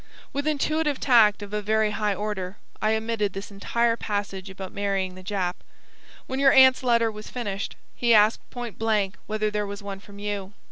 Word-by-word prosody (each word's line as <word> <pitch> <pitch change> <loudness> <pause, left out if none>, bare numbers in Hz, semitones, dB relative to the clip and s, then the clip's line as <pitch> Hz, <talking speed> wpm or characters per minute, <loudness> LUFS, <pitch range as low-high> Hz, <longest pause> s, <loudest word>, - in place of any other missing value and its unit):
With 280 +2 -2
intuitive 305 0 0
tact 215 -5 +5
of 205 0 -9
a 210 - 0
very 215 +1 +2
high 210 -1 0
order, 200 -2 -4 0.2
I 215 +1 +3
omitted 220 -3 -1
this 195 +1 -7
entire 230 +4 +1
passage 205 -4 -3
about 190 -1 -8
marrying 195 -2 -1
the 185 - -11
Jap. 185 -2 -2 0.7
When 260 +1 -3
your 275 -1 +6
aunt's 260 -1 +7
letter 235 -3 +3
was 215 0 -9
finished, 205 -5 -4 0.2
he 240 -1 +1
asked 215 0 +4
point 240 -3 -7
blank 210 -3 +1
whether 215 0 -1
there 210 -1 -1
was 200 +1 -7
one 200 -1 -6
from 200 0 -14
you. 205 -1 -4
210 Hz, 185 wpm, -25 LUFS, 200-230 Hz, 0.7 s, aunt's